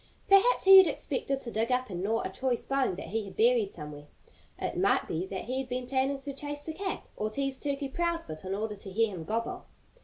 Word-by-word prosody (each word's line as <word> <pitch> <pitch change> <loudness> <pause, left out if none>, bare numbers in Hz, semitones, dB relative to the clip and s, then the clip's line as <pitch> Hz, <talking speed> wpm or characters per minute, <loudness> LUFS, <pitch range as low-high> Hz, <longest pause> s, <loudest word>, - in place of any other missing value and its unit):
Perhaps 395 +6 +5
he 385 0 +11
had 375 - +7
expected 275 - -2
to 235 - -6
dig 225 +3 0
up 250 -3 0
and 175 -1 -4
gnaw 220 +4 0
a - - -3
choice 245 +5 -2
bone 270 -8 +1
that 195 - -7
he 220 +2 -1
had 195 - -11
buried 230 -3 +3
somewhere. 150 -2 -9 0.5
It - - -3
might - - +2
be 175 +4 -2
that 190 -1 -5
he 255 +3 -2
had 265 -1 -5
been 250 0 -2
planning 265 +2 0
to 280 0 -5
chase 290 +1 -5
the 320 - -4
cat, 380 +3 -4
or 215 - -2
tease 275 +3 -2
Turkey 280 -1 -2
Proudfoot 330 - -3
in 190 +1 -3
order 210 +1 -3
to 200 0 -10
hear 225 +3 +2
him 165 -3 -6
gobble. 225 +5 -3
250 Hz, 235 wpm, -29 LUFS, 200-275 Hz, 0.5 s, he